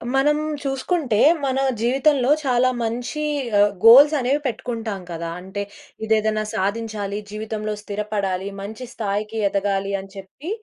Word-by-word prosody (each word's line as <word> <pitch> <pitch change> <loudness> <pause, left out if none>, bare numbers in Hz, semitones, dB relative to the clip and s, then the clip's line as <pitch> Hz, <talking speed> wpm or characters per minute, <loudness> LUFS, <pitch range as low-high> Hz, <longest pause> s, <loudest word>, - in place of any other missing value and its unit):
మనం 295 +2 +3 0.3
చూసుకుంటే, 270 - -1 0.3
మన 265 0 0 0.2
జీవితంలో 265 +2 +2 0.2
చాలా 255 -1 +3
మంచి 240 +6 -3 0.3
ఆహ్, 205 0 +5
గోల్స్ 275 +7 +9
అనేవి 265 +3 +1
పెట్టుకుంటాం 230 -5 -3
కదా! 170 0 -4
అంటే 190 +2 -5 0.4
ఇదేదైనా 215 0 +1
సాధించాలి. 205 0 -2
జీవితంలో 215 0 -4
స్థిరపడాలి. 200 -2 -3
మంచి 220 +5 -7
స్థాయికి 210 +1 -3
ఎదగాలి 195 0 -1
అని 195 0 -10
చెప్పి 195 - -9
220 Hz, 120 wpm, -22 LUFS, 200-255 Hz, 0.4 s, గోల్స్